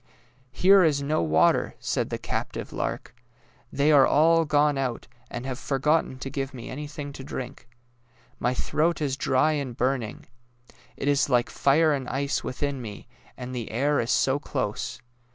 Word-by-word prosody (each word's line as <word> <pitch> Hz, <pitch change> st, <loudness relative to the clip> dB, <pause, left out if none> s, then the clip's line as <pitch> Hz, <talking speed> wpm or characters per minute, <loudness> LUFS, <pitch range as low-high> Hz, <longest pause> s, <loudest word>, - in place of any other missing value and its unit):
'' 130 Hz, +2 st, -34 dB
Here 190 Hz, +8 st, +5 dB
is 145 Hz, -4 st, +2 dB
no 150 Hz, -, 0 dB
water," 80 Hz, -1 st, +2 dB
said -, -, -2 dB
the -, -, -3 dB
captive -, -, -4 dB
lark. -, -, -4 dB
'^ -, -, -32 dB, 0.5 s
They 145 Hz, +2 st, +2 dB
are 140 Hz, -3 st, +7 dB
all 165 Hz, +2 st, +4 dB
gone 150 Hz, -1 st, +3 dB
out, 130 Hz, -3 st, -3 dB, 0.2 s
and 120 Hz, -, -6 dB
have 130 Hz, -1 st, -4 dB
forgotten 145 Hz, 0 st, 0 dB
to 135 Hz, -, -6 dB
give 135 Hz, 0 st, -4 dB
me 120 Hz, -, -8 dB
anything 145 Hz, +1 st, -6 dB
to 135 Hz, -, -9 dB
drink. 125 Hz, -2 st, -7 dB, 0.7 s
My 125 Hz, +1 st, 0 dB
throat 160 Hz, +6 st, 0 dB
is 140 Hz, -4 st, -1 dB
dry 135 Hz, +2 st, +2 dB
and 140 Hz, -6 st, -3 dB
burning. 125 Hz, -3 st, -1 dB, 0.7 s
It -, -, -3 dB
is 145 Hz, 0 st, +2 dB
like 120 Hz, -2 st, +2 dB
fire 155 Hz, +3 st, +3 dB
and 135 Hz, -3 st, -3 dB
ice 140 Hz, +3 st, -1 dB
within 140 Hz, +1 st, -3 dB
me, 105 Hz, -2 st, -8 dB, 0.3 s
and 125 Hz, 0 st, -7 dB
the 120 Hz, -3 st, -4 dB
air 140 Hz, +6 st, +1 dB
is 115 Hz, -, -2 dB
so 135 Hz, +2 st, +2 dB
close. 105 Hz, -6 st, -3 dB
135 Hz, 170 wpm, -26 LUFS, 125-150 Hz, 0.7 s, are